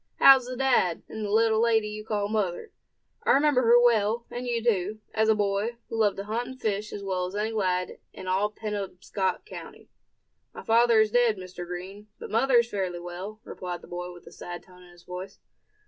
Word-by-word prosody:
How's 265 Hz, -2 st, +7 dB
the 255 Hz, 0 st, -5 dB
dad, 245 Hz, -10 st, +2 dB
and 220 Hz, -, -6 dB
the 205 Hz, -, -3 dB
little 220 Hz, +1 st, +3 dB
lady 225 Hz, -2 st, +3 dB
you 210 Hz, 0 st, -6 dB
call 210 Hz, -2 st, -1 dB
mother? 210 Hz, -, -2 dB, 0.5 s
I -, -, +4 dB
remember 285 Hz, -2 st, +4 dB
her 240 Hz, 0 st, +6 dB
well; 230 Hz, -1 st, +3 dB
and 245 Hz, +1 st, -5 dB
you 235 Hz, -2 st, -1 dB
too, 210 Hz, -2 st, 0 dB
as 220 Hz, 0 st, +2 dB
a 220 Hz, -, +5 dB
boy 205 Hz, +3 st, -1 dB
who -, -, -4 dB
loved 215 Hz, -3 st, +2 dB
to 195 Hz, -, -3 dB
hunt 225 Hz, +4 st, -3 dB
and 260 Hz, 0 st, -9 dB
fish 215 Hz, -2 st, -2 dB
as 200 Hz, -, -6 dB
well 185 Hz, -2 st, -1 dB
as 185 Hz, -, -8 dB
any 215 Hz, +2 st, -1 dB
lad 185 Hz, -4 st, -1 dB
in 185 Hz, -, -10 dB
all 190 Hz, +3 st, +1 dB
Penobscot 200 Hz, -, -3 dB
county." -, -, -11 dB, 0.6 s
"My -, -, -8 dB
father 230 Hz, 0 st, +5 dB
is 215 Hz, -1 st, +1 dB
dead, 240 Hz, -3 st, +3 dB
Mr. 185 Hz, -1 st, -8 dB
Green; 190 Hz, +4 st, -7 dB
but -, -, -9 dB
mother 250 Hz, +4 st, +3 dB
is 235 Hz, 0 st, +2 dB
fairly 185 Hz, -3 st, -2 dB
well," 180 Hz, +5 st, -7 dB
replied 180 Hz, -7 st, -6 dB
the -, -, -12 dB
boy, 180 Hz, 0 st, -5 dB
with 175 Hz, -1 st, -14 dB
a -, -, -12 dB
sad 175 Hz, 0 st, -8 dB
tone 180 Hz, -1 st, -18 dB
to 180 Hz, -, -15 dB
his 175 Hz, 0 st, -18 dB
voice. 180 Hz, +2 st, -8 dB
210 Hz, 210 wpm, -27 LUFS, 185-230 Hz, 0.6 s, How's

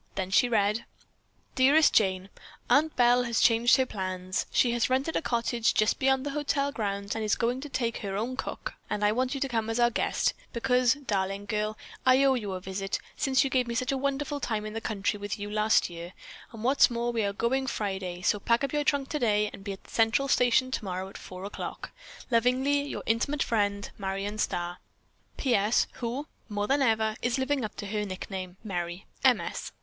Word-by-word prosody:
Then 190 Hz, -1 st, -3 dB
she 245 Hz, +5 st, +4 dB
read: 215 Hz, 0 st, +1 dB, 0.7 s
"Dearest 285 Hz, +4 st, +5 dB
Jane: 190 Hz, -2 st, +2 dB, 0.4 s
Aunt 310 Hz, +2 st, +4 dB
Belle 245 Hz, 0 st, +5 dB
has 235 Hz, -1 st, 0 dB
changed 235 Hz, +2 st, +5 dB
her 260 Hz, -, +2 dB
plans. 185 Hz, -4 st, -3 dB
She 245 Hz, -, +3 dB
has 240 Hz, 0 st, +1 dB
rented 265 Hz, +5 st, 0 dB
a -, -, +1 dB
cottage 235 Hz, -2 st, 0 dB
just 215 Hz, 0 st, +2 dB
beyond 265 Hz, 0 st, +2 dB
the 285 Hz, -, -2 dB
hotel 285 Hz, -1 st, 0 dB
grounds 200 Hz, -4 st, -3 dB
and 225 Hz, -, -3 dB
is 210 Hz, -, +2 dB
going 245 Hz, +3 st, -1 dB
to 295 Hz, -, -7 dB
take 235 Hz, -4 st, -1 dB
her 195 Hz, -1 st, -4 dB
own 240 Hz, +5 st, -2 dB
cook -, -, -5 dB, 0.2 s
and 210 Hz, 0 st, 0 dB
I 205 Hz, -, +4 dB
want 255 Hz, +4 st, 0 dB
you -, -, -3 dB
to 275 Hz, -, +1 dB
come 225 Hz, -3 st, -1 dB
as 225 Hz, +2 st, -1 dB
our 240 Hz, 0 st, +4 dB
guest, -, -, 0 dB, 0.2 s
because, 250 Hz, +1 st, +3 dB
darling 200 Hz, -7 st, -2 dB
girl, 215 Hz, +1 st, -2 dB, 0.3 s
I 260 Hz, +1 st, +5 dB
owe 270 Hz, -1 st, +5 dB
you 210 Hz, -6 st, -3 dB
a 185 Hz, -, -4 dB
visit, 195 Hz, +1 st, -3 dB, 0.2 s
since 270 Hz, -2 st, +2 dB
you 270 Hz, -, -2 dB
gave 250 Hz, -2 st, +2 dB
me 235 Hz, -, -3 dB
such 255 Hz, +1 st, 0 dB
a 270 Hz, -, 0 dB
wonderful 280 Hz, +1 st, -1 dB
time 220 Hz, -5 st, -2 dB
in 215 Hz, -, -6 dB
the 225 Hz, -, -4 dB
country 205 Hz, -1 st, -2 dB
with 205 Hz, 0 st, -4 dB
you 205 Hz, 0 st, -6 dB
last 215 Hz, +1 st, +3 dB
year, 170 Hz, +1 st, -8 dB, 0.4 s
and, 225 Hz, -1 st, -9 dB
what 265 Hz, +4 st, +1 dB
is -, -, +8 dB
more, 235 Hz, 0 st, -1 dB
we 230 Hz, -1 st, 0 dB
are 200 Hz, -, 0 dB
going 255 Hz, +6 st, 0 dB
Friday, 190 Hz, -6 st, -3 dB
so 205 Hz, -, +2 dB
pack 235 Hz, +5 st, +1 dB
up 275 Hz, -, -2 dB
your 295 Hz, 0 st, +1 dB
trunk 285 Hz, -2 st, +1 dB
today, 210 Hz, -8 st, +1 dB
and 195 Hz, -, -10 dB
be 200 Hz, -, -4 dB
at 195 Hz, -, -12 dB
the -, -, -17 dB
Central 225 Hz, +5 st, +2 dB
Station 255 Hz, 0 st, +3 dB
tomorrow 190 Hz, -5 st, -3 dB
at -, -, -16 dB
4:00. 190 Hz, +2 st, -7 dB, 0.4 s
Lovingly, 255 Hz, +5 st, +3 dB
your 285 Hz, -, -5 dB
intimate 270 Hz, +6 st, +1 dB
friend 205 Hz, -3 st, -1 dB
Marion 195 Hz, +2 st, -3 dB
Starr. 175 Hz, -2 st, -2 dB, 0.6 s
"P. 260 Hz, -3 st, +1 dB
S. 210 Hz, +2 st, +3 dB, 0.2 s
Who, 245 Hz, +5 st, -3 dB, 0.2 s
more 205 Hz, -1 st, -1 dB
than 275 Hz, +5 st, +2 dB
ever, 220 Hz, -3 st, +2 dB
is 245 Hz, +1 st, 0 dB
living 265 Hz, 0 st, 0 dB
up 215 Hz, -, -5 dB
to -, -, -6 dB
her 210 Hz, +1 st, -2 dB
nickname, 185 Hz, -1 st, -6 dB
Merry. 175 Hz, -3 st, -4 dB, 0.2 s
M. -, -, +5 dB
S." -, -, -5 dB
230 Hz, 210 wpm, -28 LUFS, 200-260 Hz, 0.7 s, is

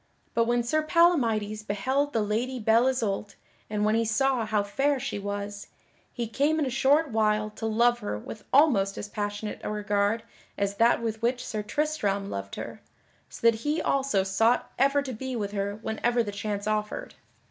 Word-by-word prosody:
But 230 Hz, -, +3 dB
when 240 Hz, +1 st, +1 dB
Sir 310 Hz, +6 st, +1 dB
Palamydes 240 Hz, -, +2 dB
beheld 260 Hz, +8 st, -1 dB
the 225 Hz, -5 st, +1 dB
Lady 235 Hz, +5 st, -1 dB
Belle 225 Hz, +3 st, +4 dB
Isoult 210 Hz, -5 st, -1 dB, 0.3 s
and 210 Hz, 0 st, 0 dB
when 215 Hz, -, +3 dB
he 230 Hz, +1 st, +2 dB
saw 235 Hz, +1 st, +1 dB
how 210 Hz, -1 st, +1 dB
fair 270 Hz, +7 st, 0 dB
she 250 Hz, -5 st, -3 dB
was, 205 Hz, 0 st, -5 dB, 0.4 s
he 240 Hz, -, -3 dB
came 285 Hz, +7 st, +1 dB
in 305 Hz, -, +1 dB
a 260 Hz, -, -2 dB
short 280 Hz, +4 st, +3 dB
while 215 Hz, -1 st, +1 dB
to 220 Hz, +1 st, -4 dB
love 240 Hz, +2 st, +3 dB
her 105 Hz, 0 st, -3 dB
with 210 Hz, -, -9 dB
almost 235 Hz, -10 st, +4 dB
as 205 Hz, -, -5 dB
passionate 205 Hz, 0 st, -4 dB
a -, -, -3 dB
regard 210 Hz, +1 st, 0 dB, 0.3 s
as 200 Hz, 0 st, -1 dB
that 235 Hz, 0 st, +4 dB
with 220 Hz, -1 st, -3 dB
which 245 Hz, +2 st, 0 dB
Sir 215 Hz, -1 st, -3 dB
Tristram 210 Hz, -6 st, -1 dB
loved 100 Hz, 0 st, -5 dB
her, -, -, -7 dB, 0.5 s
so -, -, -8 dB
that 230 Hz, -1 st, +5 dB
he 295 Hz, +6 st, -1 dB
also 270 Hz, -8 st, +1 dB
sought 225 Hz, +5 st, +2 dB
ever 275 Hz, +1 st, +3 dB
to 260 Hz, -2 st, -5 dB
be 260 Hz, +3 st, -5 dB
with 205 Hz, -3 st, -2 dB
her 200 Hz, 0 st, -2 dB
whenever 235 Hz, +2 st, +1 dB
the 205 Hz, -, -4 dB
chance 205 Hz, 0 st, -3 dB
offered. 210 Hz, 0 st, -2 dB
220 Hz, 185 wpm, -27 LUFS, 205-260 Hz, 0.5 s, that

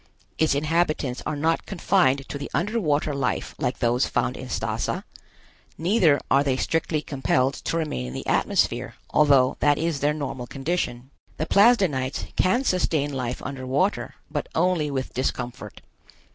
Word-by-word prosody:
Its 160 Hz, -3 st, +3 dB
inhabitants 155 Hz, -3 st, 0 dB
are 155 Hz, -, -1 dB
not 160 Hz, +3 st, 0 dB
confined 165 Hz, -8 st, +2 dB
to 140 Hz, -, -5 dB
the 140 Hz, -, -5 dB
under 210 Hz, +7 st, 0 dB
water 150 Hz, -4 st, +1 dB
life 140 Hz, -2 st, -2 dB
like 130 Hz, -3 st, -1 dB
those 120 Hz, +1 st, +1 dB
found -, -, 0 dB
in -, -, -8 dB
Stazza, -, -, -2 dB, 0.7 s
neither 170 Hz, -, +3 dB
are 140 Hz, +1 st, +5 dB
they 135 Hz, -2 st, 0 dB
strictly 160 Hz, +1 st, -1 dB
compelled 130 Hz, -1 st, +1 dB
to 165 Hz, -, -3 dB
remain 150 Hz, -, -2 dB
in 60 Hz, -, -7 dB
the -, -, -6 dB
atmosphere, -, -, +1 dB, 0.2 s
although 140 Hz, -4 st, +4 dB
that 145 Hz, -1 st, +3 dB
is 165 Hz, -3 st, -1 dB
their 150 Hz, +2 st, +1 dB
normal 135 Hz, -4 st, -4 dB
condition. 135 Hz, -3 st, -3 dB, 0.3 s
The 155 Hz, -, -1 dB
Plasdenites 190 Hz, -, +3 dB
can 240 Hz, +8 st, +2 dB
sustain 155 Hz, -, 0 dB
life 125 Hz, -2 st, -3 dB
under 130 Hz, -1 st, -5 dB
water, 185 Hz, +10 st, 0 dB, 0.2 s
but -, -, -3 dB
only 170 Hz, -3 st, +2 dB
with 135 Hz, -2 st, -3 dB
discomfort. 125 Hz, -4 st, -4 dB
145 Hz, 155 wpm, -24 LUFS, 130-165 Hz, 0.7 s, are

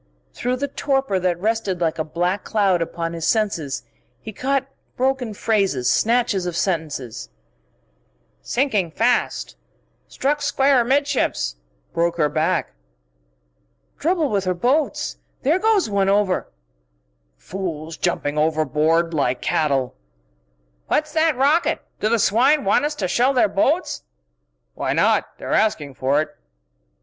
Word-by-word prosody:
Through 250 Hz, +1 st, -1 dB
the 280 Hz, +3 st, -2 dB
torpor 270 Hz, -7 st, 0 dB
that 180 Hz, -1 st, 0 dB
rested 210 Hz, -2 st, -1 dB
like 165 Hz, -2 st, -1 dB
a -, -, +1 dB
black 175 Hz, +5 st, -1 dB
cloud 195 Hz, -5 st, +1 dB
upon 165 Hz, 0 st, -3 dB
his 165 Hz, -1 st, -3 dB
senses 185 Hz, -, 0 dB, 0.4 s
he 220 Hz, -, -9 dB
caught 270 Hz, +5 st, 0 dB, 0.3 s
broken 260 Hz, -2 st, 0 dB
phrases, 195 Hz, -, +1 dB
snatches 225 Hz, -5 st, +1 dB
of 170 Hz, -1 st, -3 dB
sentences: 150 Hz, -, -3 dB, 0.6 s
"... -, -, -43 dB
sinking 225 Hz, -9 st, 0 dB
fast... 235 Hz, +8 st, 0 dB, 0.5 s
struck 290 Hz, +2 st, -1 dB
square 275 Hz, -2 st, +3 dB
amidships... 270 Hz, -, 0 dB, 0.4 s
broke 170 Hz, 0 st, 0 dB
her 150 Hz, -3 st, +2 dB
back...." 155 Hz, +2 st, 0 dB, 0.6 s
"... -, -, -44 dB
trouble 325 Hz, -2 st, +1 dB
with 200 Hz, -2 st, 0 dB
her 185 Hz, 0 st, 0 dB
boats. 265 Hz, -, 0 dB, 0.3 s
There 310 Hz, +7 st, +3 dB
goes 430 Hz, -, +3 dB
one 200 Hz, -2 st, +1 dB
over!..." 200 Hz, -2 st, +1 dB, 0.5 s
"... -, -, -46 dB, 0.2 s
fools 165 Hz, -4 st, -4 dB
jumping 145 Hz, 0 st, -1 dB
overboard 155 Hz, +2 st, +1 dB
like 130 Hz, -5 st, 0 dB
cattle...." 135 Hz, -5 st, 0 dB, 0.9 s
"What's 305 Hz, 0 st, 0 dB
that 315 Hz, -3 st, +2 dB
rocket? 290 Hz, +6 st, +2 dB, 0.2 s
Do 215 Hz, -, +1 dB
the 235 Hz, -, +3 dB
swine 250 Hz, +7 st, +3 dB
want 200 Hz, +8 st, +3 dB
us 300 Hz, 0 st, -2 dB
to 195 Hz, -9 st, -2 dB
shell 250 Hz, +8 st, +2 dB
their 250 Hz, -4 st, +4 dB
boats?" 280 Hz, -, 0 dB, 0.7 s
"Why -, -, -2 dB
not? -, -, +1 dB
They're -, -, -4 dB
asking 155 Hz, -10 st, +1 dB
for 135 Hz, +4 st, +1 dB
it!" -, -, -14 dB
195 Hz, 135 wpm, -21 LUFS, 155-260 Hz, 0.9 s, their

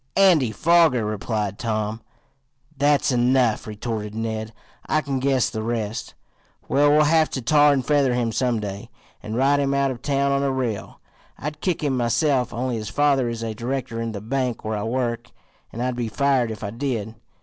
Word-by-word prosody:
"Andy 175 Hz, -, +5 dB
Foger," 160 Hz, -1 st, +3 dB
replied 105 Hz, -1 st, -3 dB
Tom. 110 Hz, -1 st, -2 dB, 0.7 s
"That's 145 Hz, 0 st, +2 dB
enough," 125 Hz, -2 st, +2 dB
retorted 105 Hz, 0 st, -5 dB
Ned. 110 Hz, -1 st, -3 dB, 0.4 s
"I 155 Hz, -, +3 dB
can 140 Hz, -3 st, -2 dB
guess 135 Hz, -2 st, +1 dB
the 110 Hz, -, -3 dB
rest. 115 Hz, 0 st, -3 dB, 0.5 s
We'll 145 Hz, +2 st, +4 dB
have 160 Hz, +1 st, +3 dB
to -, -, -3 dB
tar 150 Hz, +3 st, +5 dB
and 135 Hz, -3 st, 0 dB
feather 140 Hz, -4 st, +2 dB
him 120 Hz, -2 st, 0 dB
some 120 Hz, -1 st, 0 dB
day, 100 Hz, -1 st, -6 dB, 0.3 s
and 110 Hz, +1 st, -5 dB
ride 140 Hz, +3 st, +3 dB
him 140 Hz, -1 st, +1 dB
out 140 Hz, -1 st, +2 dB
of 125 Hz, -2 st, -7 dB
town 140 Hz, 0 st, +1 dB
on 140 Hz, 0 st, +1 dB
a 140 Hz, -, +1 dB
rail. 125 Hz, -6 st, -3 dB, 0.4 s
I'd 150 Hz, +1 st, -6 dB
kick 180 Hz, -4 st, -1 dB
him 140 Hz, -3 st, +1 dB
myself, 125 Hz, +2 st, +1 dB
only 125 Hz, +1 st, -2 dB
his 110 Hz, -1 st, -5 dB
father 135 Hz, +1 st, +2 dB
is 115 Hz, -1 st, -4 dB
a 110 Hz, -1 st, -3 dB
director 120 Hz, 0 st, -3 dB
in 115 Hz, 0 st, -3 dB
the 100 Hz, -2 st, -6 dB
bank 125 Hz, +1 st, -2 dB
where 110 Hz, 0 st, -1 dB
I 105 Hz, -, -3 dB
work, 120 Hz, +1 st, -2 dB, 0.4 s
and 120 Hz, -, -4 dB
I'd 125 Hz, -1 st, -1 dB
be 120 Hz, -1 st, -2 dB
fired 130 Hz, +2 st, +1 dB
if 110 Hz, -2 st, -7 dB
I 100 Hz, -, -3 dB
did. 115 Hz, -3 st, -3 dB
125 Hz, 185 wpm, -23 LUFS, 110-140 Hz, 0.7 s, Andy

